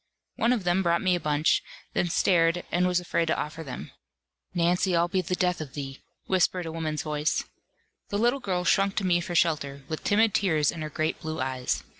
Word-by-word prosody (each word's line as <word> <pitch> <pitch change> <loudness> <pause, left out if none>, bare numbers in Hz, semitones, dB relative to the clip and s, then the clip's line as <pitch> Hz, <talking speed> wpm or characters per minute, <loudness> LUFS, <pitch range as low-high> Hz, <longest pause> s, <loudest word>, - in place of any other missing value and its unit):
One 235 - +2
of 235 -6 +1
them 175 +1 +2
brought 170 -1 +1
me 185 -1 +3
a 175 - +1
bunch, 150 -1 +2 0.3
then 175 - +1
stared, 170 0 +3
and 180 +1 +2
was 180 -1 +2
afraid 170 -1 -1
to 160 - +1
offer 155 +2 -4
them. 130 -4 -7 0.6
"Nancy, 175 +1 +2
I'll 170 +1 +3
be 185 +1 0
the 180 +1 -2
death 180 -2 0
of 145 -4 -8
thee," 135 -2 -6 0.3
whispered 185 -1 +1
a 165 - -4
woman's 160 -2 -3
voice. 150 0 0 0.7
The 205 - -1
little 240 +5 +2
girl 185 -7 -1
shrunk 195 +2 +2
to 200 - -1
me 175 -1 +3
for 175 0 -5
shelter, 145 -5 +1
with 155 - -5
timid 215 0 +3
tears 160 -7 +2
in 165 - -7
her 155 - -3
great 155 +2 -1
blue 160 0 -4
eyes. 130 -1 -2
170 Hz, 210 wpm, -27 LUFS, 155-185 Hz, 0.7 s, me